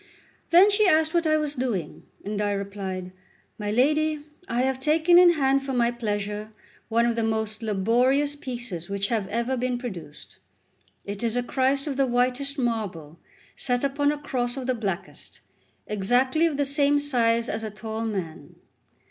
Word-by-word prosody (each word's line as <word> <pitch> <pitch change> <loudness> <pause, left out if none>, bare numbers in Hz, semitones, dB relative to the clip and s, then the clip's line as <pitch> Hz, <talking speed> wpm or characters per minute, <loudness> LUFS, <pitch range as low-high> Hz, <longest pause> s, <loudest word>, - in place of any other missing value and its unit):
Then 370 +5 +7
she 415 0 +4
asked 315 -2 +3
what 340 -2 +2
I 310 0 +3
was 300 -1 -1
doing, 235 - -4 0.2
and 205 0 -2
I 205 -1 0
replied: 195 -2 -5 0.5
"My 205 -1 -3
lady, 300 +6 +2 0.3
I 240 +1 +1
have 265 0 0
taken 320 +5 +4
in 355 -1 +7
hand 275 -3 +2
for 270 -1 -4
my 240 -1 +2
pleasure 210 -2 -3 0.4
one 230 +1 +3
of 235 -1 +1
the 230 - 0
most 220 0 -1
laborious 245 +8 +2
pieces 240 - -6
which 200 0 -1
have 220 -5 -1
ever 235 +5 -1
been 250 0 -1
produced. 185 - -9 0.7
It 200 0 -6
is 230 -1 -1
a 245 - 0
Christ 265 +2 0
of 280 -3 -3
the 275 -1 +2
whitest 255 +4 0
marble 200 - -3 0.4
set 245 0 -1
upon 285 +1 +1
a 295 - -3
cross 250 -3 -2
of 260 - -4
the 255 - +1
blackest, 200 -7 -5 0.4
exactly 250 +10 +2
of 300 -4 -3
the 285 - +1
same 285 +1 +2
size 235 -5 +1
as 220 -1 -3
a 220 - -3
tall 220 +1 -5
man. 170 -9 -5
245 Hz, 175 wpm, -25 LUFS, 210-280 Hz, 0.7 s, Then